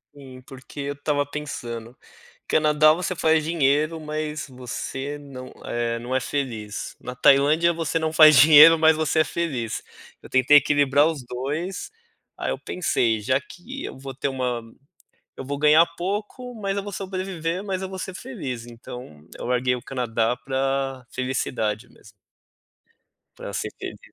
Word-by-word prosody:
Sim, 130 -2 -12
porque 135 +1 -12
eu 140 0 -3
estava 145 0 -1
pensando, 125 -5 -6 0.5
Canadá 155 0 +4
você 180 +2 -3
faz 160 -2 +2
dinheiro 155 0 +1
mas 155 0 -4
você 130 +3 -5
não 135 -3 -10
é 115 0 -2
não 125 +2 -4
é 130 - +3
feliz, 120 -6 -4
na 125 - -6
Tailândia 150 +6 +4
você 165 0 -1
não 160 0 -2
faz 155 -2 +8
dinheiro 155 +3 +9
mas 160 0 +5
você 155 0 0
é - - +6
feliz, 140 -10 -3 0.4
eu - - -13
tentei 130 +3 +6
equilibrar 145 +1 +3
os 150 -6 -3
2, 145 +10 -4 0.5
aí - - -2
eu - - -2
pensei: 115 -10 0
"Já 130 +5 +1
que 235 - -10
eu - - -7
vou 135 0 -8
ter 140 +2 -2
uma 125 -3 -2 0.8
eu 135 - -7
vou 140 +1 -4
ganhar 155 +3 +6
pouco, 210 +7 -4
mas 200 -3 -3
eu 200 - -1
vou 205 - -7
sobreviver, 185 -2 -3
mas 190 -2 -3
eu 190 - -4
vou 190 0 -7
ser 190 - -5
feliz." 140 - -6
Então 120 -9 -11
eu - - -6
larguei 125 0 +1
o 120 - -9
Canadá 120 -2 -1
pra 135 -1 -2
felicidade 125 -3 -2
mesmo. 105 - -18 1.3
Pra - - -7
ser - - -3
feliz. - - -7
145 Hz, 160 wpm, -24 LUFS, 130-160 Hz, 1.3 s, dinheiro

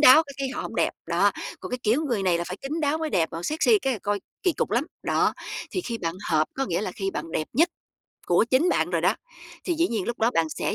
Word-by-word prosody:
đáo 300 +2 +9
cái 280 - -10
cái 270 -1 -1
họ - - -3
hổng - - -6
đẹp, - - +2 0.2
đó. - - +3 0.3
Còn - - -7
cái 250 - -2
kiểu 240 +9 +2
người 235 -7 0
này 180 -3 +2
là 170 - -2
phải 185 - -5
kín 300 +4 -3
đáo 300 +1 +1
mới 315 -1 -2
đẹp, 165 -3 +2
còn 165 +1 -5
sexy 330 - +3
cái 270 -6 0
là 230 - -3
coi 205 0 0 0.2
kỳ 365 - +3
cục - - -1
lắm, 240 +6 +2 0.2
đó. - - +2 0.4
Thì 370 - -1
khi 235 -9 -4
bạn 165 -3 -2 0.2
hợp 155 -1 +3
có 270 - -1
nghĩa 170 -3 0
là 185 -4 -3
khi 195 0 -2
bạn 165 - -5
đẹp 155 - -1
nhất 330 +7 +4 0.6
của 175 +4 +4
chính 260 +8 +3
bạn - - +1
rồi - - +1
đó, - - +3 0.5
thì 350 - 0
dĩ 335 +2 +2
nhiên 220 -5 -1
lúc 235 - -3
đó 225 +2 +3
bạn 165 -7 +1
sẽ - - -2
235 Hz, 280 wpm, -26 LUFS, 185-300 Hz, 0.6 s, đáo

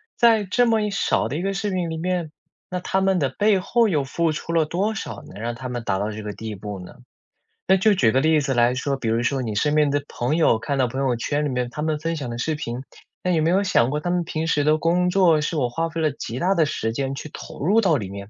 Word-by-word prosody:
在 225 -3 +4
这 240 +6 +2
么 225 -1 +3
一 210 -1 -1
少 155 - +1
的 140 +6 -3
一 - - -2
个 195 +1 -1
视 205 0 -2
频 180 -3 -1
里 160 - -4
面， 175 -2 -2 0.4
那 180 0 -2
他 190 +2 -1
们 190 -1 +2
的 135 -3 +1
背 205 +7 +2
后 230 +4 +2
又 150 -5 +1
付 165 +4 0
出 165 +2 -5
了 160 -2 +3
多 195 +7 -1
少 - - -6
能 100 - -11
让 120 0 -3
他 125 +1 -6
们 120 -2 -4
达 95 - 0
到 105 +1 -2
这 110 +1 -6
个 105 -1 -5
地 110 -1 -6
步 100 0 -7
呢？ 90 - -10 0.7
那 190 0 +5
就 210 +2 +4
举 115 -10 +3
个 130 - +2
例 155 -1 +3
子 135 -1 -1
来 120 +1 +4
说， 135 +1 -1
比 120 - -4
如 115 +1 +1
说 130 +1 0
你 110 -2 -3
身 150 +7 +1
边 150 -2 +4
的 145 -1 0
朋 125 +6 -1
友， 135 -8 +4
看 140 +4 -2
到 125 - +3
朋 130 +4 -4
友 130 -3 +1
圈 145 +5 -1
里 - - -1
面 125 -1 -2
他 150 +4 -6
们 155 -1 -1
分 165 +1 -2
享 140 -6 -5
的 120 - -5
视 155 +4 -1
频， 125 -4 -5 0.4
那 180 - 0
有 160 -2 +2
没 165 - +2
有 195 +2 +3
想 130 -10 +3
过 150 - -1
他 175 - -3
们 175 -1 +1
平 160 0 -3
时 145 -3 +2
的 155 +1 +3
工 180 +2 +2
作， 170 -5 +4
是 155 +2 -2
我 125 -4 +1
花 165 +6 -2
费 165 0 -4
了 155 - +3
极 125 -2 -6
大 190 +2 +2
的 160 -2 +3
时 140 -6 -2
间 135 +1 -2
去 150 - -7
投 - - -8
入 215 +5 +4
到 170 -7 +3
里 100 -6 -5
面， 100 0 -8
150 Hz, 310 characters per minute, -23 LUFS, 125-180 Hz, 0.7 s, 那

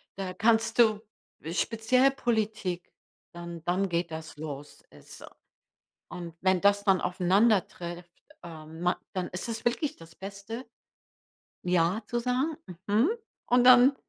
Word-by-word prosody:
Da 190 -1 -4
kannst 225 0 +2
du 215 -3 +5 0.5
speziell 230 +8 +2
Politik, 215 -8 -2 0.4
dann 170 -1 -8
dann 185 +2 +1
geht 170 0 -1
das 160 -1 -7
los. 145 -2 -8
Ist - - -14
so. - - -11 0.8
Und 170 -2 -7
wenn 185 -1 +2
das 200 0 +4
dann 195 -2 +3
aufeinandertrifft, 180 -2 +1 0.3
ähm, 160 -1 -10
ma 180 0 +2 0.2
dann 185 -2 -2
ist 180 +5 -5
es 225 -1 -5
wirklich 275 +5 0
das 165 0 -15
Beste, 200 +7 -8 1.0
„Ja“ 180 +4 +1
zu 240 +3 -2
sagen, 255 +6 0 0.3
„Mhm“ 220 - +3 0.4
Und 245 0 +4
dann 255 +2 +8
195 Hz, 130 wpm, -28 LUFS, 175-230 Hz, 1.0 s, dann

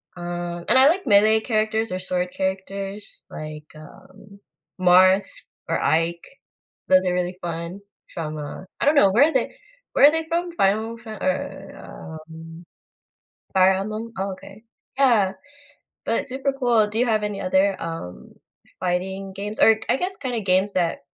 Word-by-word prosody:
um, 175 0 -5
and - - +5
I 265 +2 +7
like 360 -3 -1
melee 215 +1 +5
characters 220 -1 -1
or 185 - -2
sword 180 0 -2
characters 195 +1 -4
like, 155 0 -8
um, 200 +6 -15 0.4
Marth 185 +2 +5 0.4
or - - 0
Ike. 165 +1 +1 0.7
Those 185 0 +5
are 180 - +1
really 180 0 -2
fun 170 +3 -5 0.3
from, 155 -2 -4
uh, 150 +5 -7 0.2
I - - +1
don't 295 - +5
know 200 -7 +6
where 240 +9 +5
are - - -8
they - - -1 0.4
where 285 - +7
are - - +7
they 320 0 -2
from? 345 +1 -1
Final 220 -2 0
Fa 220 -3 -9
or 180 -3 -5
um, 165 +1 -11 0.9
Fire 190 0 +5
Emblem, 215 +4 -4
oh 195 0 -2
okay. 195 +3 -12 0.4
Yeah, 225 -8 +4 0.7
but 230 - -1
super 270 +1 -2
cool. 235 -5 +3
Do 215 +2 -3
you 250 - +3
have 215 -2 +1
any 205 -1 -3
other, 190 +1 +1
um, 165 - -7 0.5
fighting 190 +2 -3
games 205 +2 -6
or 220 0 +6
I - - +3
guess 375 +4 -3
kinda 245 -5 -3
games 190 +1 +1
that 175 -2 0
195 Hz, 160 wpm, -23 LUFS, 180-220 Hz, 0.9 s, I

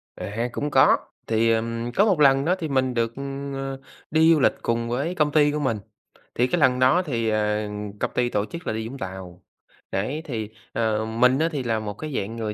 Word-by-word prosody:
À, 115 +4 -3
cũng 145 +4 -3
có, - - +6 0.3
thì, 115 +1 +2
ờm, 115 +1 -1
có 205 - +5
một 195 -7 +2
lần 135 -1 +5
đó 180 +3 +3
thì 160 - -2
mình 130 -3 +1
được, 115 -1 0 0.4
ờ, 135 0 -4 0.3
đi 160 +2 +5
du 155 - +2
lịch - - +4
cùng 115 0 -1
với 140 +9 -1
công 150 -3 +2
ty 145 -1 +4
của 150 - -2
mình, 130 -7 0 0.6
thì 125 - +2
cái 175 - 0
lần 125 -2 +4
đó 130 +8 +4
thì, 115 -5 -1
ờ, 105 0 0 0.3
công - - -1
ty 120 -1 +1
tổ 105 -3 0
chức 170 +8 -9
là - - 0
đi 110 0 -3
Vũng 135 +4 -8
Tàu. 95 -4 -8 0.5
Đấy, 130 +11 -2
thì, 110 -6 -4 0.2
ờ, 110 -1 0
mình 125 +4 +3
á 165 +1 +2
thì 145 -5 -3
là 115 -2 0
một 105 -1 -5
cái 155 +8 -7
dạng 110 +2 -3
người 110 -2 -3
120 Hz, 225 wpm, -24 LUFS, 110-145 Hz, 0.6 s, có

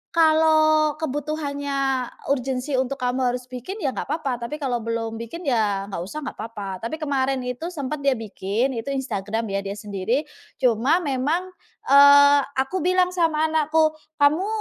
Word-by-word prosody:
kalau 310 -1 +4
kebutuhannya 285 -3 -2 0.2
urgensi 265 +1 -1
untuk 260 +1 -1
kamu 250 -1 0
harus 250 0 -9
bikin 300 - -6
ya 270 - +1
nggak - - -5
apa-apa, 255 -7 -2
tapi 300 - -5
kalau 260 -5 -2
belum 225 0 -3
bikin 335 +10 -7
ya 210 -7 0
nggak 180 - -4
usah 305 +6 -6
nggak - - -7
apa-apa. 200 -5 -6
Tapi 315 - -4
kemarin 270 -4 -1
itu 250 +7 -4
sempat 300 -4 -4
dia 275 -2 +2
bikin, 220 +3 -2
itu 225 - -8
Instagram 225 -4 -2
ya 195 - 0
dia 200 0 -5
sendiri, 210 +7 -2 0.3
cuma 255 +8 +2
memang, 300 +6 -1 0.4
eee, 285 0 +8 0.2
aku 270 +8 -1
bilang 365 +1 +2
sama 325 -3 +1
anakku, 315 0 +3 0.2
"Kamu 305 +7 +3
275 Hz, 155 wpm, -23 LUFS, 240-310 Hz, 0.4 s, eee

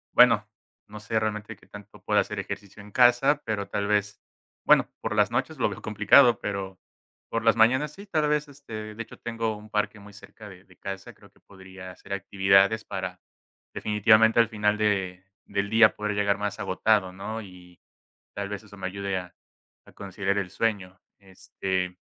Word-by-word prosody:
Bueno, - - +6 0.4
no 105 +1 -9
sé 110 +1 -1
realmente 105 -1 -4
qué - - -23
tanto 105 0 -13
pueda - - +2
hacer - - -4
ejercicio 100 +1 -8
en 105 - -14
casa, 125 +5 +4
pero 100 -3 -3
tal 100 0 -2
vez, 105 0 0 0.4
bueno, - - +5
por - - -3
las - - +3
noches - - -2
lo - - +2
veo - - -8
complicado, 110 +3 +5
pero 95 -2 -5 0.5
por 115 0 -3
las 115 - +5
mañanas 130 +6 +3
sí, 200 +6 -12
tal 155 -5 0
vez, 150 0 0
este, 110 -7 -9
de 115 - -4
hecho, - - -14
tengo 115 -2 -3
un 105 +1 -14
parque 105 0 -1
muy 100 0 -14
cerca 105 +1 -13
de 95 -1 -14
de 90 -2 -22
casa. 95 +1 -7
Creo - - -20
que - - -28
podría 95 -1 -12
hacer 100 - -12
actividades 95 +3 +3
para 95 -2 -5 0.5
definitivamente 110 +2 +4
al 115 - +4
final 105 -1 0
de 95 -3 -1 0.2
del 100 0 -3
día 110 -1 +6
poder 105 0 -2
llegar 100 0 +1
más 105 -1 -3
agotado, 95 -1 +1
¿no?, 110 +4 -6
y, 90 -3 -15 0.6
tal 100 -1 -3
vez 105 0 -6
eso 100 -1 -14
me 95 -1 -5
ayude 100 0 -3
a 90 -1 -10 0.5
a - - -17
conciliar 100 0 -3
el 95 -3 -3
sueño, 100 -4 -2 0.2
este 95 -1 -4
105 Hz, 185 wpm, -26 LUFS, 95-110 Hz, 0.6 s, Bueno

